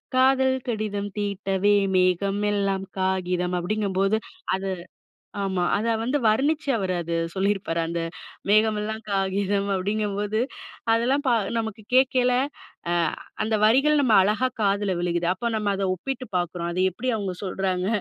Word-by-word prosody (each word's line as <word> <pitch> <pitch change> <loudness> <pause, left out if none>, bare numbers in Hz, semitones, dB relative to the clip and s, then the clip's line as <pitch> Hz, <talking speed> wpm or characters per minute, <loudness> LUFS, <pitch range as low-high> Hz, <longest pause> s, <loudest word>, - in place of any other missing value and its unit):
காதல் 260 0 +4
கடிதம் 210 -3 -2
தீட்டவே, 200 0 +1 0.2
மேகமெல்லாம் 195 +2 +1 0.2
காகிதம். 180 -1 0
அப்டிங்கும்போது 195 +1 0 0.4
அது 195 0 -3 0.7
ஆமா. 190 -2 -1
அத 230 +3 +1
வந்து 255 +6 0
வர்ணிச்சு 280 +8 +2
அவரு 190 -3 -1
அது 170 0 -4 0.2
சொல்லிருப்பாரு. 195 -3 0
அந்த 170 0 -2 0.5
மேகமெல்லாம் 215 +1 +2
காகிதம் 195 +1 0
அப்டிங்கும்போது, 205 +2 -1 0.5
அதெல்லாம் 255 +5 +2
ப - - +4 0.3
நமக்கு 220 -1 -4
கேட்கைல 255 -1 +4 0.6
அ - - +2 0.5
அந்த 220 0 0
வரிகள் 275 +7 +5
நம்ம 250 -5 +3
அழகா 210 +6 +2
காதுல 200 -1 +1
விழுகுது. 175 0 0
அப்ப 235 +5 -2
நம்ம 210 -2 0
அத 195 - -2
ஒப்பிட்டு 255 +8 -4
பாக்குறோம். 175 -1 -2
அது 175 - -3
எப்டி 255 +8 -3
அவங்க 200 -4 -3
சொல்றாங்க? 185 -1 -1
205 Hz, 125 wpm, -25 LUFS, 190-220 Hz, 0.7 s, வரிகள்